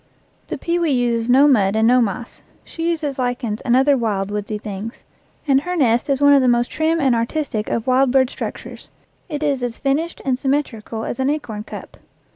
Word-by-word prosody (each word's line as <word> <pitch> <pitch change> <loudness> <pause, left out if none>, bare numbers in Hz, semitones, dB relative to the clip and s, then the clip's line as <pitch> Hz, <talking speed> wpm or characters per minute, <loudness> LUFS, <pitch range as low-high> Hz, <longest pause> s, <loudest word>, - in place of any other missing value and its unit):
The - - -4
pewee 340 -1 0
uses 240 -3 0
no 270 +4 +6
mud 205 -7 +3
and 220 +1 +3
no 250 +1 +5
moss. 230 +2 -4 0.2
She 330 +1 -4
uses 300 -5 -2
lichens 245 -3 -2
and 245 -2 +2
other 275 +2 +4
wild, 205 -5 -1
woodsy 210 +1 -3
things, 210 +2 -7 0.4
and 270 -1 +4
her 360 +4 -3
nest 245 -5 +2
is 275 -1 +1
one 285 0 +6
of 280 - +5
the 255 - +2
most 240 0 +2
trim 320 +1 0
and 270 -5 +3
artistic 230 -1 -2
of 230 - -2
wild 260 +1 +3
bird 260 0 +3
structures; - - -7 0.4
it 300 -1 -4
is 280 -3 0
as 240 -2 -3
finished 295 +5 -1
and 260 -2 0
symmetrical 255 -6 -2
as 240 - -5
an 265 +1 +1
acorn 245 -8 -3
cup. - - -10
255 Hz, 200 wpm, -20 LUFS, 230-285 Hz, 0.4 s, no